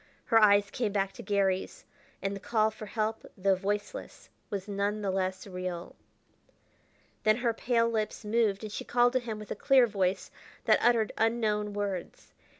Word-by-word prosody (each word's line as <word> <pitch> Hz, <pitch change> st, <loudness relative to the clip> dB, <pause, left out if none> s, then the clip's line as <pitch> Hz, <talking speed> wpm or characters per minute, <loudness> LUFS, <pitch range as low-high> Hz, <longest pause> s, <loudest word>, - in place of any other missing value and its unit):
Her 225 Hz, -, +5 dB
eyes 205 Hz, -1 st, +5 dB
came 225 Hz, -4 st, -1 dB
back 195 Hz, -1 st, 0 dB
to -, -, -9 dB
Garry's, 195 Hz, -2 st, -1 dB, 0.4 s
and 195 Hz, 0 st, -1 dB
the -, -, -6 dB
call 220 Hz, +2 st, +1 dB
for 215 Hz, 0 st, -9 dB
help 220 Hz, +1 st, -2 dB
though 195 Hz, 0 st, +3 dB
voiceless 205 Hz, -, -4 dB, 0.2 s
was 200 Hz, -1 st, -4 dB
none 205 Hz, +1 st, -1 dB
the 195 Hz, -, 0 dB
less 190 Hz, 0 st, -2 dB
real. 180 Hz, -2 st, -5 dB, 1.3 s
Then 215 Hz, 0 st, +3 dB
her 240 Hz, -2 st, +1 dB
pale 230 Hz, 0 st, +1 dB
lips 220 Hz, -1 st, -2 dB
moved, 210 Hz, -2 st, +1 dB
and 215 Hz, -, -5 dB
she -, -, -4 dB
called 245 Hz, 0 st, +3 dB
to 255 Hz, -, +3 dB
him 230 Hz, -3 st, -5 dB
with 210 Hz, -1 st, -9 dB
a -, -, -1 dB
clear 270 Hz, -3 st, +5 dB
voice 190 Hz, -3 st, -1 dB, 0.3 s
that 215 Hz, -, +4 dB
uttered 230 Hz, -2 st, +3 dB
unknown 215 Hz, -2 st, +1 dB
words. 200 Hz, -3 st, -5 dB
210 Hz, 170 wpm, -29 LUFS, 195-225 Hz, 1.3 s, Her